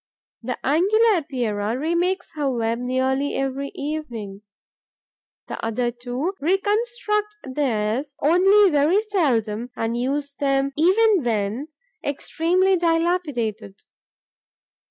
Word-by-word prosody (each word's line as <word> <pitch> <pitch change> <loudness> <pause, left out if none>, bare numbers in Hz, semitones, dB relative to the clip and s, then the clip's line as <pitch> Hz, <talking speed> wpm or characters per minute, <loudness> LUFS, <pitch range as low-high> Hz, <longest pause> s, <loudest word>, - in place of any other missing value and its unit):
The 245 +1 -4
Angular 405 - +4
Epeira 235 -7 -2
remakes 345 +5 -1
her 295 -3 -1
web 230 -2 -1
nearly 260 +3 0
every 270 +1 -2
evening; 240 -10 -5 1.1
the - - -6
other 240 +2 -1
two 250 +8 -4
reconstruct 420 - 0
theirs 260 0 -1
only 380 +5 +5
very 310 +8 +3
seldom 245 - 0
and 225 +1 -2
use 280 +4 -2
them 275 -1 0
even 385 +3 +4
when 225 +4 -1 0.4
extremely 350 +6 +1
dilapidated. 330 - -1
280 Hz, 95 wpm, -23 LUFS, 240-355 Hz, 1.1 s, only